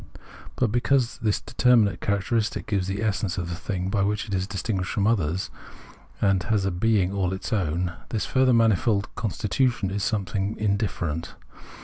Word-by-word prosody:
But 125 -5 +1
because 125 +1 +1
the 110 - 0
determinate 110 0 +2
characteristic 105 +2 0
gives 100 -4 -1
the 100 +3 -2
essence 100 -3 -1
of 90 -2 -3
the 85 - -3
thing, 95 +1 -3
by 100 - +1
which 105 +2 0
it 100 - -5
is 95 0 0
distinguished 95 -1 -2
from 100 - 0
others, 95 -5 0 0.7
and 95 -2 +3
has 105 -3 0
a 95 - +1
being 95 0 +2
all 95 -2 0
its 95 +5 -4
own, 90 -3 0 0.2
this 110 - -1
further 130 -1 +3
manifold 115 -2 +2
constitution 110 -1 0
is 100 0 -2
something 100 0 -1
indifferent. 100 -6 -2
100 Hz, 160 wpm, -25 LUFS, 95-110 Hz, 0.7 s, and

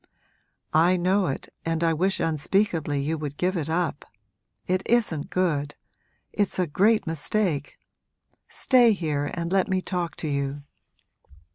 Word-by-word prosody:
'I 170 +4 +4
know 185 +2 +2
it, 135 - -4 0.2
and 165 0 -1
I 165 -1 +3
wish 190 +5 0
unspeakably 160 -1 0
you 155 +3 -2
would 145 -1 -5
give 185 +2 0
it 160 -3 -2
up 165 -3 -1 0.6
it 185 +1 0
isn't 210 -11 +1
good 150 -6 0 0.6
it's 205 -2 0
a 185 - +2
great 205 +8 +2
mistake. 165 -1 -1 0.7
Stay 245 -4 +4
here 150 -6 -2
and 170 0 -3
let 190 -1 +2
me 190 -1 +1
talk 180 -2 -3
to 160 - -4
you.' 140 0 -2
170 Hz, 140 wpm, -25 LUFS, 150-190 Hz, 0.7 s, I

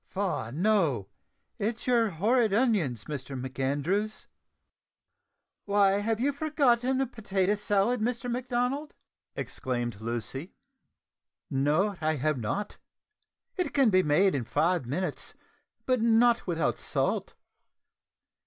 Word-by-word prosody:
"Faugh! 190 - -3
no, 160 - +1 0.5
it's 220 +3 -2
your 235 -3 +3
horrid 215 +5 +2
onions, 195 - +1
Mr 135 -2 -5
MacAndrews." 145 +11 -2 1.4
"Why, 200 -1 +3
you - - -1
have 235 +6 0
forgotten 265 -5 +2
the 270 - +2
potato 200 -5 -1
salad, 210 +3 +1
Mr 240 +2 -1
Macdonald," 250 +4 -2 0.4
exclaimed 120 -4 -3
Lucy. 120 - -5 1.0
"No, 155 +9 +1
I 155 0 +1
have 150 0 0
not: 195 - -3 0.8
it 365 - -2
can 270 -6 +4
be 185 0 +5
made 185 +5 +3
in 135 - -1
five 165 +3 0
minutes, 155 +4 -3 0.5
but 255 -3 +1
not 230 0 +4
without 165 -2 0
salt. - - -1
200 Hz, 110 wpm, -28 LUFS, 145-235 Hz, 1.4 s, be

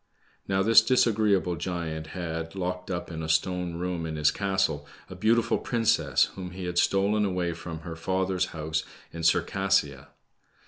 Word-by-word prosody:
Now 95 0 +1
this 115 +2 +7
disagreeable 110 -6 +2
giant 80 -2 -4
had, 80 0 -5
locked 90 -1 -3
up 90 -2 -4
in 80 -1 -5
a 80 - -4
stone 90 +2 0
room 85 -1 -3
in 80 - -4
his 75 -1 +3
castle, 95 -7 -1 0.2
a - - -7
beautiful 115 +1 +2
princess 85 - +2
whom 90 -2 -6
he 95 0 -6
had 90 0 0
stolen 100 +3 +2
away 90 -3 -1
from 80 -1 -7
her 85 -1 -7
father's 95 +2 0
house 80 0 -3 0.3
in 85 - -6
Circassia. 85 -4 +1
90 Hz, 155 wpm, -27 LUFS, 80-95 Hz, 0.3 s, this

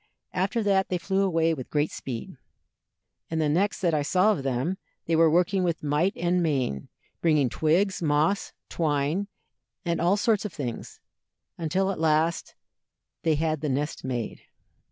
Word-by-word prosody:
After 200 +5 0
that 195 -2 +2
they 180 - 0
flew 190 +2 0
away 165 -4 +2
with 130 -5 -6
great 150 +1 0
speed, 120 -4 -6 0.9
and 160 - -1
the 155 - +2
next 185 +8 +1
that 175 -3 +2
I 150 - +2
saw 185 +8 +3
of 195 - -1
them 135 +8 -1 0.3
they 165 - +1
were 165 0 +5
working 180 +3 +2
with 170 -3 -1
might 150 +7 +1
and 180 -3 +1
main, 130 - -1 0.3
bringing 150 -6 +3
twigs, 180 - +1
moss, 155 +5 +1 0.2
twine, 155 +4 0 0.6
and 170 -1 0
all 180 +4 +3
sorts 215 -1 +2
of 210 -5 -5
things, 125 -6 -6 0.6
until 185 +4 0
at 190 - -5
last 160 +1 +1 0.7
they 160 -2 +2
had 155 -1 -1
the 150 - -1
nest 145 +3 -2
made." 120 -4 -4
165 Hz, 160 wpm, -26 LUFS, 150-190 Hz, 0.9 s, were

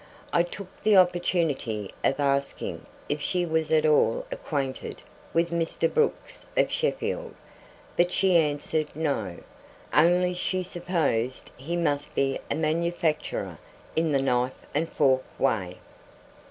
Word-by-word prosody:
I 170 - +5
took 185 +2 -7
the 210 -2 +5
opportunity 170 - +1
of 135 - +2
asking 140 -1 -1 0.2
if 145 0 -2
she 180 +3 +1
was 160 -1 0
at 155 -1 +4
all 145 -7 +3
acquainted 135 -3 -4 0.3
with 170 +1 +1
Mr. 170 -1 0
Brooks 460 -1 0
of - - +3
Sheffield, - - -1 0.6
but 175 +1 +3
she 190 -1 +3
answered 150 -1 +1
No, 140 - -1 0.6
only 180 +3 +4
she 185 +1 0
supposed 165 -9 -1
he 165 +7 -4
must 145 -4 -1
be 135 0 +1
a - - 0
manufacturer 160 0 -1 0.4
in 160 -1 +2
the 135 -2 +2
knife 125 0 0
and 160 +3 0
fork 130 -3 +3 0.2
way. 100 -9 0
160 Hz, 125 wpm, -27 LUFS, 140-175 Hz, 0.6 s, I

